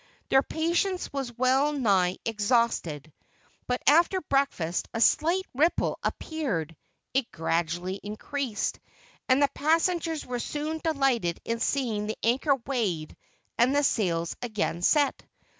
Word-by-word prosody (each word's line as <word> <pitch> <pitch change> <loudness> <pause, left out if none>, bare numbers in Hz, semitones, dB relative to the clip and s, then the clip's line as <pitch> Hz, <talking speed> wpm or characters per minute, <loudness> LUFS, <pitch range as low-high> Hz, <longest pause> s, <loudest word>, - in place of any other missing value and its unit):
Their 270 - +5
patience 340 +5 -1
was 260 -4 -4
well 265 +4 +3
nigh 195 -9 +2
exhausted, 205 - 0 0.5
but 250 0 -1
after 340 +6 +5
breakfast 275 - -1
a - - -1
slight 340 +10 +3
ripple 310 +7 +1
appeared. 195 - -3 0.4
It 260 -2 0
gradually 175 +2 -2
increased, 215 +2 -3 0.5
and 260 +2 +5
the 280 - +3
passengers 325 +1 +1
were 245 -1 -3
soon 300 +5 -3
delighted 270 - +1
in 230 0 -2
seeing 230 -6 -1
the 220 - -3
anchor 265 +5 +3
weighed 200 - -2 0.4
and 250 +4 +4
the 290 - +3
sails 170 -10 0
again 215 -7 -2
set. 290 - +2
250 Hz, 125 wpm, -27 LUFS, 200-290 Hz, 0.5 s, Their